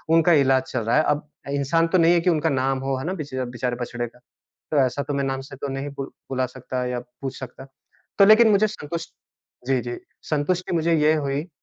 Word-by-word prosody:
उनका 165 +1 +5
इलाज 130 -1 +3
चल 125 - -1
रहा 115 +1 0
है, 155 - +4
अब 150 0 0 0.2
इंसान 145 +4 +2
तो 185 - +2
नहीं 170 0 +5
है 170 - +4
कि 180 - +2
उनका 160 -1 +2
नाम 135 -1 0
हो 135 0 -1
है 140 - -5
ना 185 - -1
बेच 150 -6 -7
बेचारे 125 -1 -2
बछड़े 120 0 -3
का। 125 - -19 0.5
तो 155 - 0
ऐसा 130 +3 -2
तो 145 - -4
मैं 140 0 0
नाम 135 0 -2
से 135 - -9
तो 140 - -5
नहीं 135 +1 -4
बु 135 - -3 0.3
बुला 130 -1 0
सकता 130 0 -5
या 125 0 -2
पूछ 125 +2 -8
सकता। 130 +1 -9 0.5
तो 200 - +8
लेकिन 220 +2 +7
मुझे 210 +1 +4
संतुष 170 -4 -5 0.6
जी, 130 -2 +2
जी 120 0 -5 0.3
संतुष्टि 175 +5 0
मुझे 165 +1 +2
ये 155 +1 +4
हुई। 145 +2 -2
140 Hz, 225 wpm, -23 LUFS, 130-165 Hz, 0.6 s, तो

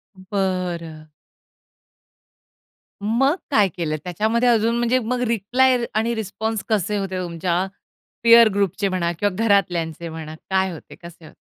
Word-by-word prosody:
बरं. 185 -5 -3 2.0
मग 255 +8 +2 0.2
काय 210 -7 +4
केलं? 160 -3 -1
त्याच्यामध्ये 220 +7 +1
अजून 230 0 +2
म्हणजे 240 +2 +2
मग 245 +2 -2
रिप्लाय 245 +4 +2 0.2
आणि 225 +2 +1
रिस्पॉन्स 220 0 -3
कसे 210 -1 0
होते 195 -2 -3
तुमच्या 175 +1 -1 0.6
पिअर 230 0 +8
ग्रुपचे 200 0 0
म्हणा 175 -2 -1
किंवा 205 -1 +1
घरातल्यांचे 170 -6 0
म्हणा. 160 -1 -7
काय 190 0 +1
होते? 165 - -11
कसे 170 -1 -13
होते? - - -15
195 Hz, 125 wpm, -22 LUFS, 175-225 Hz, 2.0 s, पिअर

